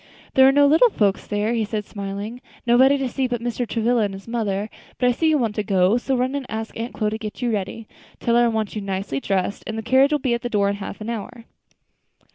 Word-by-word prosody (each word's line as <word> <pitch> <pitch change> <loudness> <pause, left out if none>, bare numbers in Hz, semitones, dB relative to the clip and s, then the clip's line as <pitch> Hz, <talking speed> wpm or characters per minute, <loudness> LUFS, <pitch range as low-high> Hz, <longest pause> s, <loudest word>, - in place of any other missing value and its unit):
"There 265 0 +7
are - - +7
no 285 +1 +5
little 320 +12 +6
folks 205 - 0
there," 210 +2 0
he 230 -2 +1
said 210 -1 -3
smiling, 200 +4 -6 0.2
"nobody 260 +4 +5
to 270 -1 -1
see 260 +1 -1
but 245 -1 -2
Mr. 240 +1 -3
Travilla 235 +1 +1
and 200 -2 -1
his 195 +2 -12
mother. 210 -3 -1 0.3
But 250 - +3
I - - +4
see 320 +6 +1
you 310 - +3
want 230 -6 0
to 210 - 0
go; 195 +1 +3
so 265 +2 -1
run 255 +2 0
and 280 -3 -4
ask 220 0 -5
Aunt 230 +2 -5
Chloe 210 -2 0
to 220 - -4
get 215 +3 -6
you 240 - +1
ready. 215 +2 -4 0.3
Tell 235 - +1
her 240 0 +5
I - - +3
want 220 -2 -2
you 210 - -3
nicely 195 -7 -3
dressed, 195 +4 -1
and 220 - -4
the 225 - -4
carriage 265 +5 +4
will 300 - +3
be 260 -4 -1
at 235 - -1
the 245 - -3
door 200 -3 +2
in 200 - -2
half 200 +1 -7
an 215 - -5
hour." 230 +1 -7
230 Hz, 260 wpm, -22 LUFS, 205-245 Hz, 0.3 s, There